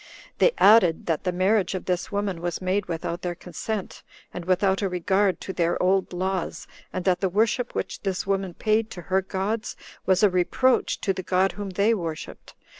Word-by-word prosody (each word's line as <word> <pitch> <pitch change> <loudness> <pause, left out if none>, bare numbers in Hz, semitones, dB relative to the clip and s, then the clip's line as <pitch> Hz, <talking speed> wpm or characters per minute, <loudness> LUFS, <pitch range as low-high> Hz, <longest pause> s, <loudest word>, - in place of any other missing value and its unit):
They - - +5
added, 200 -6 +5
that 165 +2 -1
the 180 - +1
marriage 190 +2 +1
of 185 - -5
this 180 +2 -2
woman 200 -4 -2
was 175 0 -2
made 185 +2 -1
without 170 0 -4
their 175 -1 -3
consent, 185 +4 -5 0.3
and 180 - -6
without 190 +2 +2
a 195 - 0
regard 190 +2 +1
to 190 - -5
their 170 -2 0
old 190 +1 +2
laws; 185 0 -3 0.3
and 185 - -4
that 185 -2 +3
the 190 - +1
worship 225 +5 0
which - - -3
this 190 -2 -2
woman 195 -2 -1
paid 215 +1 +1
[to 180 - -8
her 190 - +4
gods] 200 +4 -3 0.3
was 190 +2 +3
a 205 - +7
reproach 210 +8 +2
to 195 - +1
the 185 - -4
God 185 +1 +2
whom 205 -1 -6
they 200 +4 +2
worshipped. 165 -7 -6
190 Hz, 190 wpm, -25 LUFS, 180-205 Hz, 0.3 s, a